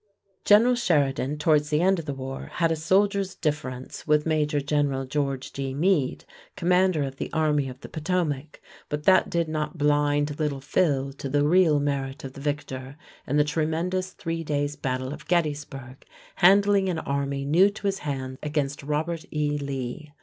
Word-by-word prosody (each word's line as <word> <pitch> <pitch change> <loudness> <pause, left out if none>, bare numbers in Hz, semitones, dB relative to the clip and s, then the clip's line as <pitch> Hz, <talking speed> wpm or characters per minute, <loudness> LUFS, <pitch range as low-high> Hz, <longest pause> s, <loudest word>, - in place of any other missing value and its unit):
General 225 +4 +6
Sheridan, 150 - +1
towards 150 -1 +2
the 150 - +2
end 190 +1 +3
of 165 - -6
the 145 - -3
war, 135 0 -6
had 165 -1 +1
a - - +2
soldier's 195 +4 +1
difference 145 -5 -4
with 150 -1 +3
Major 155 -2 +1
General 140 -2 0
George 135 -1 -2
G. 135 -1 -4
Meade, 155 -4 +1 0.3
commander 180 -2 +2
of 135 -1 -5
the - - -5
Army 150 -3 +1
of 130 +1 -11
the - - -8
Potomac, 155 -3 -2 0.3
but 150 0 -3
that 190 +2 +5
did 170 -1 0
not 155 +2 -3
blind 145 0 +1
"Little 150 -3 -1
Phil" 140 -1 0
to 135 0 -6
the 145 +1 +2
real 165 -3 +4
merit 140 -1 -2
of 135 -1 -7
the 140 - -10
victor 140 -2 -4 0.3
in 145 - +1
the 150 - +5
tremendous 165 +5 -1
three 165 0 -4
days' 145 -1 -1
battle 130 0 -3
of - - -11
Gettysburg, 145 -6 -2 0.3
handling 200 +1 +5
an 175 - -1
army 140 -1 -2
new 175 +8 +5
to 205 - -11
his 195 -1 0
hand 130 -2 -4
against 145 -2 -2
Robert 155 +3 -2
E. 150 -1 -1
Lee. 140 +1 -5
150 Hz, 170 wpm, -25 LUFS, 140-165 Hz, 0.3 s, General